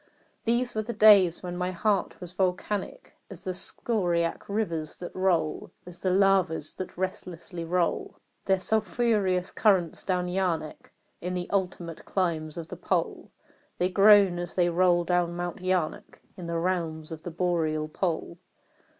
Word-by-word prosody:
These 240 +2 +1
were 215 - -1
days 210 -6 +5
when 175 -1 -5
my 180 0 -1
heart 195 +3 -1
was 180 -1 -9
volcanic 190 - -2 0.2
As - - -7
the 185 - -3
scoriac 175 -4 0
rivers 170 -7 -2
that 175 - -8
roll 175 -5 0 0.2
As 175 -1 -7
the 190 - 0
lavas 185 -5 +2
that 185 - -7
restlessly 180 -2 -5
roll 175 +1 -1 0.3
Their 190 -1 +2
sulphurous 210 -3 +1
currents 190 -6 +2
down 180 -2 0
Yaanek 180 -4 -2 0.3
In 180 +1 -3
the 180 -1 -3
ultimate 180 -4 -2
climes 165 -5 -1
of 165 -2 -6
the - - -7
pole - - -2 0.5
That 180 +1 0
groan 200 -3 +6
as 175 - -6
they 175 -1 +3
roll 175 0 +3
down 175 0 0
Mount 175 0 -4
Yaanek 185 -3 -2 0.2
In 180 -3 -8
the 170 0 -2
realms 165 -3 -2
of 160 -1 -7
the 175 - -6
boreal 160 -3 -1
pole. 170 +1 -3
180 Hz, 150 wpm, -27 LUFS, 170-190 Hz, 0.5 s, groan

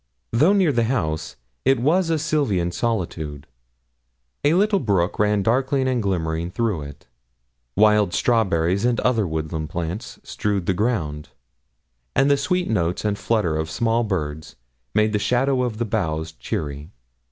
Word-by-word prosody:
Though 155 - +4
near 190 -6 +3
the 120 -3 +1
house, 85 -10 -2 0.3
it 135 -1 +3
was 165 +7 +2
a 165 - +2
sylvan 140 - 0
solitude; 85 - -3 1.0
a 145 +3 +4
little 200 +1 +3
brook 100 - 0
ran 105 -1 +2
darkling 130 +4 +1
and 125 -2 +1
glimmering 85 -4 -1
through 105 -4 -1
it, 70 -1 -10 0.7
wild 105 -2 +4
strawberries 95 -5 +2
and 120 -1 +2
other 115 -6 +2
woodland 80 -1 -3
plants 85 +7 -5
strewed 100 -3 -2
the 95 - +2
ground, 90 -8 -2 0.9
and 135 +2 +4
the - - +6
sweet 180 +6 0
notes 90 -3 -1
and 100 -1 0
flutter 105 -9 +1
of 80 0 -2
small 115 +6 +1
birds 80 -7 -4 0.4
made 110 0 +3
the 105 - +2
shadow 125 +4 +1
of 120 -4 -2
the 120 - -1
boughs 80 -7 -2
cheery. 75 -1 -5
105 Hz, 150 wpm, -22 LUFS, 85-125 Hz, 1.0 s, the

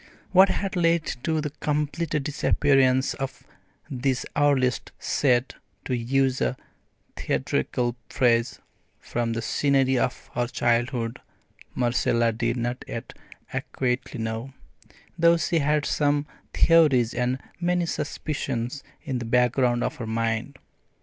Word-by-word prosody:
What 190 +1 +7
had 195 -1 -2
led 170 -2 +2 0.2
to 160 +1 0
the 150 -1 -3
complete 150 +2 -1
disappearance 135 -2 +2
of 135 -1 -6 0.4
this 130 0 -1
earliest 140 -3 +2
"set," 125 -2 +1 0.3
to 130 - -1
use 130 +2 +1
a 130 - 0 0.6
theatrical 120 -1 -1
phrase, 120 -2 +2 0.4
from 115 -1 -2
the 115 0 -3
scenery 135 0 +2
of 125 - -2
her 120 0 0
childhood, 120 0 0 0.6
Marcella 120 -1 +2
did 115 +2 -1
not 120 +1 -3
yet - - -6 0.4
adequately 125 0 -2
know, 115 +4 -4 0.7
though 170 +1 +5
she 165 +1 +1
had 150 0 +1
some 145 -1 +1 0.3
theories 140 -8 +4
and 125 +1 0 0.2
many 175 0 +1
suspicions 140 -4 -3 0.2
in 130 -2 -2
the 120 - -5
background 125 +1 +2
of 155 - -2
her 120 -5 -5
mind. 115 +4 -2
130 Hz, 120 wpm, -25 LUFS, 120-145 Hz, 0.7 s, What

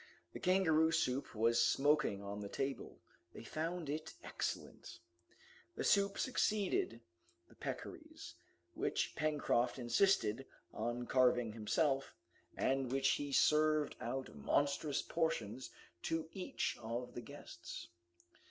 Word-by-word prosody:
The - - -6
kangaroo 160 -4 +4
soup 130 -5 0
was 115 +2 +3
smoking 145 -8 +2
on 100 +1 -5
the 100 -1 -5
table. 135 +4 -3 0.4
They - - -8
found 165 +1 -3
it 155 +3 -4
excellent. - - -4
To 85 - -10 0.8
the - - -1
soup 200 0 +3
succeeded 205 - +1 0.5
the - - -19
peccaries, - - -7 0.4
which - - -1
Pencroft 145 -5 +1
insisted 120 - +2 0.3
on 120 +2 -2
carving 125 -3 +3
himself, 135 +5 0 0.4
and 135 0 +1
of - - -6
which 135 0 +3
he 145 -1 -4
served 155 +1 +4
out 130 +2 -3
monstrous 145 0 +1
portions 130 -8 -1 0.3
to 165 -1 -1
each 185 -9 -2
of 120 +2 -4
the 120 - -5
guests. 115 - -9
135 Hz, 120 wpm, -37 LUFS, 120-155 Hz, 0.8 s, kangaroo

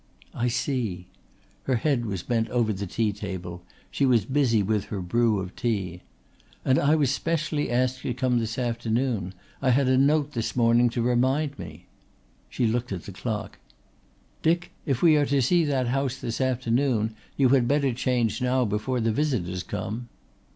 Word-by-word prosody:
"I 120 0 -1
see." 115 -8 -2 0.6
Her 130 - +1
head 120 -1 0
was 95 -4 -3
bent 115 -2 0
over 115 -3 +1
the 100 0 -4
tea 110 +2 0
table; 95 -4 -6 0.3
she - - -1
was 120 -7 +4
busy 130 -5 +2
with 105 0 0
her 100 - -5
brew 110 +4 +1
of 95 -1 -6
tea. 95 -7 -2 0.6
"And 130 0 +4
I 150 +2 +3
was 145 -5 +2
specially 155 0 -1
asked 130 +1 0
to - - -2
come 125 -1 +1
this 115 0 -3
afternoon. 115 -5 -1 0.3
I 135 - +2
had 130 +1 +3
a 130 0 +4
note 145 +1 +3
this 115 -5 -3
morning 120 0 +4
to 115 0 -2
remind 130 +4 +1
me." 75 -4 -9 0.6
She 125 - -1
looked 120 +1 -1
at 90 -4 -4
the - - -8
clock. 105 +1 -5 0.8
"Dick, 170 +2 +1 0.2
if 135 0 0
we 160 -3 +6
are 145 - +3
to 140 0 +2
see 170 +7 +3
that 130 -4 0
house 135 0 0
this 115 -1 -4
afternoon 125 -3 +1 0.2
you 135 -3 +4
had 125 -2 +4
better 140 -2 +2
change 125 -1 0
now 125 0 +2
before 110 +4 -1
the 115 0 +1
visitors 105 - -1
come." 115 +7 -5
120 Hz, 175 wpm, -26 LUFS, 110-135 Hz, 0.8 s, we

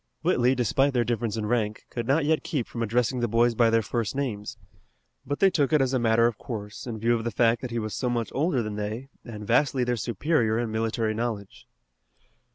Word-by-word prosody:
Whitley, 125 +2 +3
despite 135 +3 +2
their 120 -2 +2
difference 115 -2 -2
in 110 - -2
rank, 110 -2 -1
could 120 -1 -4
not 145 +3 +2
yet 155 +1 +2
keep 140 -9 -2
from 115 - -6
addressing 120 +3 +1
the 120 - +1
boys 115 +2 +3
by 115 0 +4
their 115 0 +2
first 115 +1 -2
names. 110 -7 -3 0.7
But 145 - -1
they 195 -1 +5
took 145 -4 +1
it 155 - +4
as 135 -1 +1
a 130 - +2
matter 115 0 +3
of 120 -3 0
course, 105 -1 -7
in 115 -2 -4
view 115 +2 +2
of 115 -1 -1
the 120 - -1
fact 115 +1 +2
that 130 - -4
he 120 - -3
was 110 -2 -3
so 125 - -1
much 120 -2 -2
older 140 -4 +1
than 105 -1 -5
they 110 +6 -4
and 105 -3 -8
vastly 130 +3 +2
their 120 0 0
superior 115 - 0
in 115 -1 -1
military 110 0 -1
knowledge. 110 -3 -4
120 Hz, 225 wpm, -26 LUFS, 110-125 Hz, 0.7 s, they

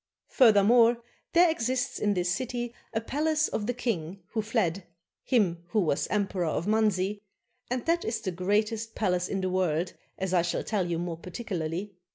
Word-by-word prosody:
Furthermore, 230 +1 +6 0.4
there 345 +1 +7
exists 255 -1 -1
in 205 -1 +1
this 180 -1 0
city 240 +3 -3 0.2
the 225 - -1
palace 310 +5 +1
of 205 - -3
the 245 - 0
king 195 -7 -3
who 220 - -1
fled, 200 -5 0 0.4
him 185 -9 +1
who 195 +5 +1
was 160 -7 +1
emperor 195 -2 0
of 155 +2 -1
Manzi, 210 -2 +1 0.5
and 250 -1 -2
that 335 +1 +2
is 225 - -2
the 190 - -3
greatest 210 +5 -1
palace 180 -4 0
in 195 - -1
the 185 - 0
world, 175 -1 0 0.2
as 190 -1 -2
I 175 - +5
shall 170 0 -1
tell 195 -5 -1
you 170 - 0
more 170 -1 -3
particularly. 180 0 -4
205 Hz, 175 wpm, -28 LUFS, 180-230 Hz, 0.5 s, there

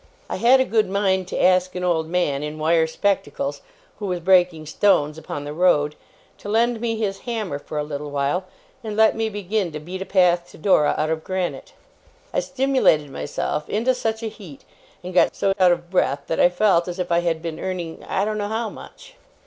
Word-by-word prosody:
I - - -1
had 240 +6 +5
a 260 - +3
good 220 -5 +1
mind 190 -2 +1
to - - -4
ask 185 0 +3
an 180 - -3
old 165 -3 +1
man, 165 -6 0
in 150 +1 -5
wire 160 +1 +2
spectacles, 145 -6 -1 0.4
who 205 - -4
was 180 -1 -2
breaking 175 -3 +3
stones 155 -2 +2
upon 155 -2 -6
the 145 0 -6
road, 150 -3 +3 0.5
to 205 - -8
lend 230 +1 +1
me 230 -1 -1
his 200 -3 -2
hammer 215 -11 -3
for 150 - -7
a 150 - 0
little 150 0 -5
while, 145 +6 -1 0.4
and 215 -1 -5
let 220 0 +5
me 225 0 -1
begin 205 -2 -2
to 150 - -4
beat 180 +5 -7
a - - -3
path 175 -2 +3
to - - -14
Dora 155 -4 +3
out 155 +1 0
of 160 0 -2
granite. 185 -2 -4 0.6
I - - +2
stimulated 265 - +2
myself 145 +2 -3
into 235 +5 +1
such 225 -2 -3
a - - -1
heat, 200 - -11 0.4
and 180 +1 -6
got 180 - +3
so 195 -1 +1
out 180 -1 +6
of 175 0 -2
breath, 140 -6 +1
that 165 - -2
I 175 - +6
felt 180 -1 +2
as 175 0 -5
if 180 -2 -3
I 170 - +4
had 165 -2 -1
been 165 -2 -5
earning 175 -3 -5
I 195 - +1
don't 215 0 -2
know 205 - -2
how 220 +1 -2
much. - - -13
180 Hz, 215 wpm, -22 LUFS, 160-210 Hz, 0.6 s, out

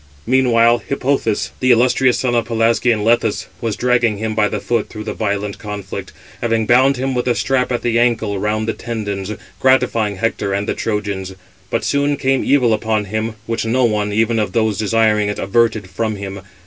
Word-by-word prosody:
Meanwhile 120 -2 +4
Hippothous, 135 -5 0
the 130 - +1
illustrious 125 +1 +4
son 125 -2 0
of 120 -1 +1
Pelasgian 115 -1 +1
Lethus, 115 -1 +1 0.2
was 115 -3 -1
dragging 120 -3 +1
him 110 +1 -3
by 105 -1 +2
the 105 - -3
foot 115 +2 -1
through 110 -1 -7
the 110 - -4
violent 100 -1 -3
conflict, 105 -2 -6 0.3
having 115 -1 +1
bound 130 +4 +4
him 130 +1 -1
with 125 0 -1
a 120 - +2
strap 130 -1 0
at 120 - -1
the 115 -1 +1
ancle 115 -4 +1
round 110 +2 -1
the 115 - 0
tendons, 105 -4 -4 0.3
gratifying 125 -5 +2
Hector 100 -1 -1
and 100 +1 -2
the - - 0
Trojans. 100 -3 -3 0.3
But - - -1
soon 140 0 +1
came 135 -1 +1
evil 125 -5 +3
upon 110 -1 0
him, 110 +2 -3
which 115 0 -2
no 120 +3 +2
one, 105 -2 0
even 115 +2 +1
of 105 - -2
those 110 -3 +1
desiring 110 -1 +2
it, 105 - -3
averted 110 0 +1
from 110 +4 -2
him. 100 -1 -7
115 Hz, 185 wpm, -18 LUFS, 105-120 Hz, 0.3 s, Meanwhile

